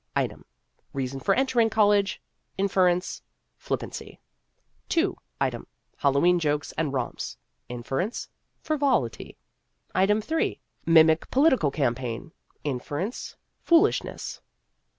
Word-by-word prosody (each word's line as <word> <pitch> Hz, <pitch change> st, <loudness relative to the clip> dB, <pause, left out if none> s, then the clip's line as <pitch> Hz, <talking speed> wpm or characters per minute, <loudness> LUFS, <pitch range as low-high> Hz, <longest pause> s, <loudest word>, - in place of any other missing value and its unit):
Item: -, -, -1 dB, 0.5 s
Reason 135 Hz, 0 st, -3 dB
for 195 Hz, -, +2 dB
entering 245 Hz, -4 st, +3 dB
college. 205 Hz, -2 st, +3 dB, 0.4 s
Inference: 185 Hz, -2 st, +1 dB, 0.3 s
Flippancy. -, -, -5 dB, 0.8 s
II. 360 Hz, +3 st, +3 dB, 0.3 s
Item: -, -, -1 dB, 0.3 s
Hallowe'en 150 Hz, +6 st, +3 dB
jokes 150 Hz, -2 st, 0 dB
and 155 Hz, -3 st, -1 dB
romps. 130 Hz, -3 st, -3 dB, 0.3 s
Inference: 135 Hz, -, -3 dB, 0.4 s
Frivolity. 275 Hz, -, 0 dB, 0.6 s
III. 195 Hz, +3 st, +4 dB
Item: 220 Hz, -, -3 dB, 0.6 s
Mimic 160 Hz, -1 st, +5 dB
political 260 Hz, -, +4 dB
campaign. 125 Hz, -1 st, -2 dB, 0.3 s
Inference: 145 Hz, -, -3 dB, 0.3 s
Foolishness. 340 Hz, +5 st, +2 dB
175 Hz, 90 wpm, -26 LUFS, 140-220 Hz, 0.8 s, Mimic